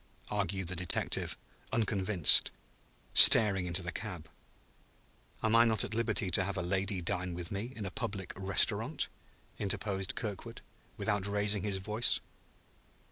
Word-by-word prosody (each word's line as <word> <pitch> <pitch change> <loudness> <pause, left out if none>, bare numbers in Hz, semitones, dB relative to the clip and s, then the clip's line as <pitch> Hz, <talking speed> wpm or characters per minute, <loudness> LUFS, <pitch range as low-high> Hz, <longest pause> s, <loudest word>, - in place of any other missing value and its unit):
argued 95 -2 -4
the 90 - -3
detective, 90 0 -3 0.3
unconvinced, 100 -5 +3 0.6
staring 95 -4 +9
into 85 +1 -3
the 85 - -5
cab. 90 -8 -8 1.2
"Am 110 0 0
I 115 - +5
not 110 -4 0
at - - -7
liberty 110 -4 -2
to 95 - +2
have 100 +1 -5
a 90 - -4
lady 95 +1 -3
dine 90 -1 -4
with 85 -1 -7
me 105 +5 -6
in 105 - -7
a 95 - -7
public 95 0 -6
restaurant?" 95 -3 0 0.5
interposed 95 -1 -4
Kirkwood, 105 -5 -8 0.4
without 105 -2 -3
raising 105 0 -1
his 100 0 -2
voice. 105 +5 0
95 Hz, 135 wpm, -30 LUFS, 90-105 Hz, 1.2 s, staring